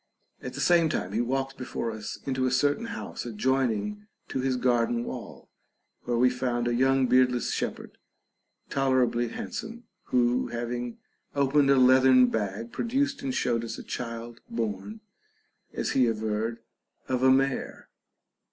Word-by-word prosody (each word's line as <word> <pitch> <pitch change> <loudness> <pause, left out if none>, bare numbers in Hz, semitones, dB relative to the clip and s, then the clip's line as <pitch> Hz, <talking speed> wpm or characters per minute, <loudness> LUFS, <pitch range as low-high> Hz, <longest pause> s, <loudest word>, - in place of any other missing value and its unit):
At - - -6
the - - -4
same 170 -2 +4
time 95 -10 -2
he 110 +3 0
walked 135 +2 -2
before 120 -2 -3
us 110 -1 -6
into 130 -1 0
a - - 0
certain 145 - +1
house 230 - -6
adjoining 130 - -1 0.2
to - - -2
his 130 0 0
gar 120 -2 +2
den 120 0 -1
wall, - - -8 0.6
where 120 -1 0
we 125 +2 +5
found 125 -1 -1
a 120 - +1
young 135 +2 +3
beardless 125 -1 +3
shepherd, - - -4 0.7
tolerably 130 -3 +1
handsome, 225 - -6 0.2
who 125 0 +2
having 120 0 -4 0.4
opened 140 0 +3
a 140 - +6
leathern 130 0 +6
bag 105 +2 -3
produced 275 +3 -1
and 130 -2 -2
showed 115 -2 0
us 115 -1 -5
a - - -8
child 115 -1 -6
born 115 - -4 0.7
(as - - -2
he 130 -2 +3
averred) 110 +1 -2 0.5
of 130 -1 -1
a 130 - +5
mare. 135 0 +1
125 Hz, 150 wpm, -27 LUFS, 120-135 Hz, 0.7 s, a